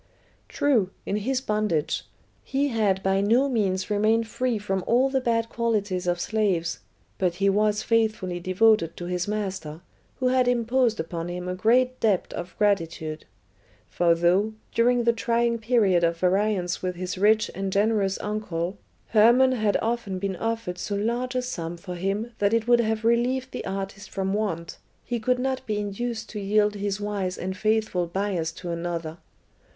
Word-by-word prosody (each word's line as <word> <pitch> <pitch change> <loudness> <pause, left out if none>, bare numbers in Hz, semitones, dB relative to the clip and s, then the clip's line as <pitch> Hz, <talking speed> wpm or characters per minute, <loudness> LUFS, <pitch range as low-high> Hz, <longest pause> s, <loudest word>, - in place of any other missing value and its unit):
True, 240 -10 +2 0.2
in 200 - -1
his 255 +5 -1
bondage 210 - -1 0.4
he 280 +2 0
had 205 -5 +1
by 190 0 +2
no 235 +7 +3
means 195 -6 0
remained 220 +2 +2
free 250 +1 -1
from 195 -2 -2
all 255 +3 +3
the 265 -1 +1
bad 230 -2 +1
qualities 210 -6 -1
of 175 0 +1
slaves, 190 -5 0 0.4
but 180 -2 +1
he 200 +2 +2
was 210 +1 +1
faithfully 215 -6 0
devoted 185 -1 +2
to 175 - -5
his 180 +1 -2
master, 190 -7 -4 0.3
who 255 - 0
had 255 -1 +3
imposed 240 -1 +2
upon 165 +1 -4
him 180 0 -5
a 180 - -2
great 250 +7 +2
debt 210 -5 +1
of 175 +1 -6
gratitude; 165 -6 0 0.6
for 170 -1 +3
though, 180 +6 +2 0.2
during 240 +1 +3
the 235 0 +3
trying 235 0 0
period 215 -6 +3
of 170 0 +2
variance 185 0 +1
with 180 -1 -2
his 180 +1 -4
rich 215 +3 +3
and 195 0 -3
generous 200 -1 +1
uncle, 195 -3 -3 0.3
Hermon 240 +4 +5
had 215 -5 +1
often 225 -4 -2
been 195 0 -2
offered 225 -3 -3
so 205 - -3
large 240 +5 -1
a 255 - 0
sum 170 -9 -4
for 180 +1 -7
him 195 +6 -2
that 205 +2 +3
it 230 0 0
would 240 0 +5
have 220 0 -1
relieved 250 +3 +1
the - - -5
artist 195 +1 -5
from 195 0 -2
want, 180 -6 -3 0.3
he 240 -1 -2
could 250 +3 +1
not 260 +1 -2
be 210 -1 -1
induced 215 +3 -3
to 210 - -5
yield 210 +1 +2
his 205 -1 -3
"wise 200 -3 -2
and 185 +1 -4
faithful 215 -3 0
Bias" 180 -2 -2
to 175 0 -6
another. 170 -1 -4
205 Hz, 170 wpm, -25 LUFS, 185-230 Hz, 0.6 s, Hermon